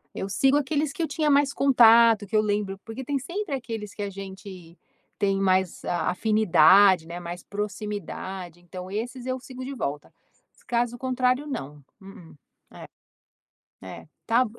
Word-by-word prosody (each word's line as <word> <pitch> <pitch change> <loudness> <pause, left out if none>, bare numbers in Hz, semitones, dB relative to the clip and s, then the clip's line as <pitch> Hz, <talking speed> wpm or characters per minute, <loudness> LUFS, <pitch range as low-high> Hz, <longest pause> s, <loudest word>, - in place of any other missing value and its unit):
eu 195 - -4
sigo 270 +8 +3
aqueles 290 0 -1
que - - -5
eu 325 - 0
tinha 310 -1 -1
mais 280 -1 +3
contato, 230 -5 +5
que 205 - -4
eu - - +5
lembro, 205 -2 -2
porque 225 +4 -7
tem 280 +2 -1
sempre 345 +3 -4
aqueles 225 -5 -6
que 205 - -4
a 200 - -3
gente 190 -3 -10 0.4
tem 195 -1 +1
mais 185 -2 +1
afinidade, 190 -2 +4
né, 170 +1 -6
mais 175 0 -7
proximidade, 200 -3 -6
então 180 +1 -9
esses 240 +4 -5
eu 260 0 -2
sigo 255 0 -9
de 275 - -5
volta. 145 - -5 0.5
Caso 240 0 0
contrário 255 +2 0
não. 145 - -6 0.2
Hum, 190 -4 -14 1.5
é. 95 -1 -10 0.2
Ta 240 +2 +3
210 Hz, 150 wpm, -25 LUFS, 190-255 Hz, 1.5 s, contato